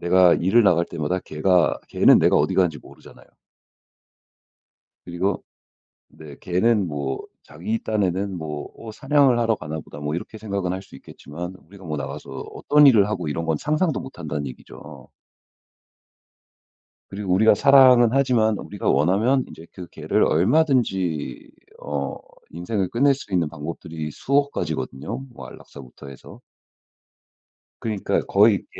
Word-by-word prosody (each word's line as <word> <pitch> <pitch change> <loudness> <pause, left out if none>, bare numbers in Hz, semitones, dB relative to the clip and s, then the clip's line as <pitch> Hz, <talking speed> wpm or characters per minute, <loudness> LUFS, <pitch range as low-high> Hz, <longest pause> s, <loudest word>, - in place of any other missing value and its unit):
내가 90 0 +4
일을 110 +7 +3
나갈 85 -3 +3
때마다 85 +3 -3
걔가 85 +2 +1
걔는 - - +5
내가 - - +3
어디 - - +1
가는지 85 -6 +1
모르잖아요. - - -17 1.8
그리고 90 +3 -2 0.7
네 75 -3 -13
걔는 100 +2 +1
뭐 70 -3 -4 0.2
자기 95 +10 -5
딴에는 100 -2 -1
뭐 75 -2 -5 0.2
어 115 - -9
'사냥을 135 +1 +2
하러 115 -2 +1
가나 80 -1 -6
보다.' 75 - -12
뭐 75 +1 -3
이렇게 110 +5 -7
생각은 100 -4 -3
할 95 - -5
수 95 - -16
있겠지만 85 +6 -9
우리가 95 0 -15
뭐 75 -2 -4
나가서 70 -1 -7
어떤 150 -1 +2
일을 105 -6 +5
하고 95 -6 -3
이런 80 +3 -3
건 80 -2 0
상상도 155 - -1
못 130 +1 -10
한다는 75 -3 -4
얘기죠. 70 +1 -12 2.0
그리고 95 -2 -4
우리가 110 +2 +5
사랑은 130 -2 +6
하지만 120 -6 +2
우리가 100 - -5
원하면 100 - +2
이제 80 - -12
그 90 -2 -9
개를 - - 0
얼마든지 95 - 0 0.3
어 70 -1 -4 0.3
인생을 90 +3 -3
끝낼 140 +4 +3
수 115 -7 -12
있는 85 -4 +1
방법들이 80 0 -7
수억 140 - 0
가지거든요 70 - -4
뭐 120 - -11
안락사부터 70 +1 -13
해서. 70 - -13 1.4
그러니까 110 -4 -1
거의 100 0 +3
95 Hz, 310 characters per minute, -22 LUFS, 80-115 Hz, 2.0 s, 사랑은